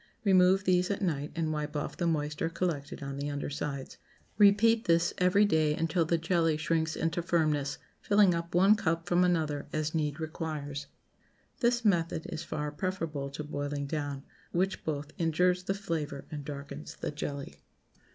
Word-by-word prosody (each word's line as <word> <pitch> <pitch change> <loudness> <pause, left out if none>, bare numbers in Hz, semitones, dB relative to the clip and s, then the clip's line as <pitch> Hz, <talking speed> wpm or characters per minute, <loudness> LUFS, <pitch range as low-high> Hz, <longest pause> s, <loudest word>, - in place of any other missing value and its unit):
Remove 190 -1 +5
these 180 -1 +2
at 200 - -1
night 150 -5 -1
and 160 -1 -1
wipe 150 0 -3
off 145 - -3
the 175 - -1
moisture 150 0 -1
collected 165 -5 -3
on 140 0 -5
the 145 +1 -3
under 145 0 -3
sides. 140 -2 -5 0.4
Repeat 220 +3 +5
this 170 0 +3
every 185 +3 +5
day 155 -5 +2
until 165 +1 +1
the 170 +1 +2
jelly 165 -1 +1
shrinks 160 0 0
into 165 +1 -1
firmness, 155 -4 +1 0.2
filling 200 -3 +5
up 170 0 -3
one 195 +4 +7
cup 165 -5 0
from 175 0 +3
another 155 -5 0
as 155 0 -1
need 150 -1 -1
requires. 150 -3 -4 0.7
This 240 -1 +2
method 165 -4 +1
is 155 - -4
far 150 -1 -3
preferable 155 -4 -3
to 145 +2 -6
boiling 145 -1 -3
down, 145 -2 -3 0.3
which 190 +2 0
both 150 -1 -3
injures 180 +2 +2
the 195 - 0
flavor 155 -8 -4
and 145 -2 -5
darkens 140 - -7
the - - -4
jelly. 140 -1 -5
160 Hz, 165 wpm, -30 LUFS, 145-180 Hz, 0.7 s, one